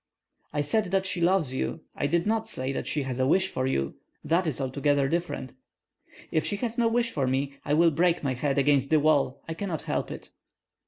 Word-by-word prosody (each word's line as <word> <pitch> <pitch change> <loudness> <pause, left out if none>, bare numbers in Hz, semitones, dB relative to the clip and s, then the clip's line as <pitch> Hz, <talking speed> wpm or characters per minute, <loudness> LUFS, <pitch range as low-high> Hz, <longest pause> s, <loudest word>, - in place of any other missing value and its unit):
"I 145 - 0
said 210 +9 +1
that 190 +1 0
she 185 -2 -2
loves 170 -6 +3
you; 155 +4 -2
I 140 - 0
did 170 +3 +1
not 220 +1 0
say 130 +1 -3
that 135 - -4
she 150 - 0
has 130 -1 -4
a 130 - +2
wish 190 +5 +3
for 130 0 -1
you, 70 - -1 0.3
that 170 +3 +1
is 150 - -2
altogether 140 +1 +1
different." 170 -5 -3 0.8
"If 160 - +1
she 205 - 0
has 230 +2 -3
no 235 -1 +2
wish 235 0 +1
for 135 - 0
me, 135 +2 0
I 145 - +1
will 165 +1 +5
break 170 +2 +2
my 135 -2 0
head 135 +2 -1
against 140 -1 +3
the 155 - +4
wall; 140 -3 +2
I 165 - -3
cannot 170 -2 -4
help - - -2
it." - - -9
150 Hz, 220 wpm, -27 LUFS, 135-180 Hz, 0.8 s, will